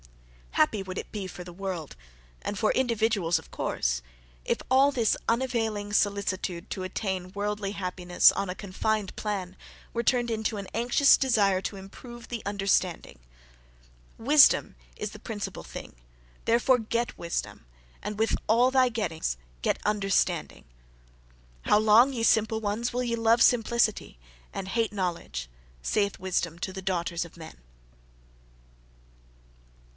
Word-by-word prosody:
Happy 195 +5 +2
would 185 -1 -7
it - - -6
be 200 -3 -4
for 180 -1 -8
the 175 0 -10
world, 180 -5 -5 0.5
and 205 - -4
for 215 - +2
individuals, 220 -8 +1
of 160 - -17
course, - - -1 0.4
if - - +1
all 270 +2 +5
this 235 -5 +2
unavailing 225 -4 -1
solicitude 200 -4 0
to 185 - -4
attain 185 -1 -3
worldly 205 0 -2
happiness, 180 -2 +3
on 200 -1 -2
a 180 - -3
confined 205 +1 -2
plan, 190 -4 -3 0.4
were 235 - -1
turned 240 -1 +2
into 220 -1 -1
an 200 -1 -6
anxious 245 +4 +5
desire 205 -8 +2
to 195 - -4
improve 235 +5 -11
the 235 -2 -5
understanding. 195 - 0 1.0
"Wisdom 280 +5 +5 0.2
is 210 - -4
the 210 - -11
principal 210 -2 -5
thing: - - -9 0.5
THEREFORE 240 +2 +4
get 235 +2 -2
wisdom; 170 - -4 0.4
and 210 0 -5
with 225 +1 +1
all 240 +4 +4
thy 260 -1 +4
gettings 165 - -2 0.2
get - - 0
understanding." 200 -2 0 1.0
"How - - +4
long 220 +5 +6
ye 235 -4 -3
simple 220 0 +3
ones, 220 +3 -2
will 250 +1 -1
ye 235 -1 -1
love 230 +1 +3
simplicity, 225 - +2 0.3
and 190 - -5
hate 225 +2 0
knowledge?" 170 - -3 0.4
Saith 200 -2 0
Wisdom 175 -3 -1
to 190 - -4
the 190 - -6
daughters 175 -2 -1
of 170 0 -13
men! 160 -1 -10
205 Hz, 140 wpm, -27 LUFS, 185-230 Hz, 1.0 s, long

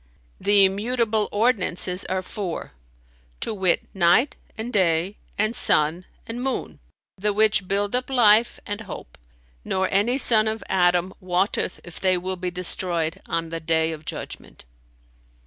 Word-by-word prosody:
The 200 -1 +6
immutable 220 +2 0
ordinances 195 -5 +1
are 185 0 -2
four; 185 -2 -5 0.7
to - - -2
wit, 190 -4 +1
night 190 +9 +3 0.2
and 230 +3 -5
day 185 0 +2 0.2
and 215 +3 0
sun 160 +2 +3 0.2
and 235 +2 -5
moon, 265 0 -3 0.4
the 210 +2 +1
which 210 -2 +3
build 200 +3 0
up 250 +1 -2
life 235 -3 +4
and 205 +1 -4
hope; 175 - -9 0.5
nor 190 0 0
any 210 +6 +2
son 220 -5 +3
of 220 -1 -2
Adam 180 0 +2
wotteth 185 +1 -1
if 175 - -10
they 185 -1 +2
will 185 +1 -3
be 180 0 -3
destroyed 180 -1 -2
on 165 0 -2
the 165 0 -4
Day 160 0 +1
of 155 -1 -8
Judgment." - - -8
190 Hz, 145 wpm, -23 LUFS, 180-215 Hz, 0.7 s, The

